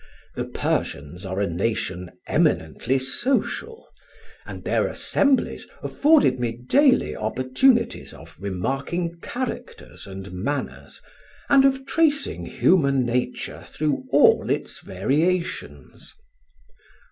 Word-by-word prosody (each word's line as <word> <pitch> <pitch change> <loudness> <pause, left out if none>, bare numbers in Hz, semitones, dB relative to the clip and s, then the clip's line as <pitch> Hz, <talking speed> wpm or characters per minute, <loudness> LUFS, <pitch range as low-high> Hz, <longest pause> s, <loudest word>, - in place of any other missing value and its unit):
The - - -3
Persians 75 +7 -3
are 95 +1 -3
a 100 - +2
nation 90 -1 -2 0.2
eminently 135 - +1
social, 270 - -2 0.6
and - - -8
their - - +1
assemblies 280 -2 +1 0.2
afforded 295 - +3
me 120 -2 -1
daily 255 - +3
opportunities 130 - +1
of 80 +2 -14
remarking 135 - -3
characters 250 - -6
and 95 -1 -8
manners, 115 +11 -5 0.5
and 275 -1 +6
of 265 0 +2
tracing 300 0 0
human 140 -8 +3
nature 125 +1 -2
through 150 -1 -2
all - - +5
its - - -2
variations. 155 - -2
135 Hz, 100 wpm, -23 LUFS, -, 0.6 s, and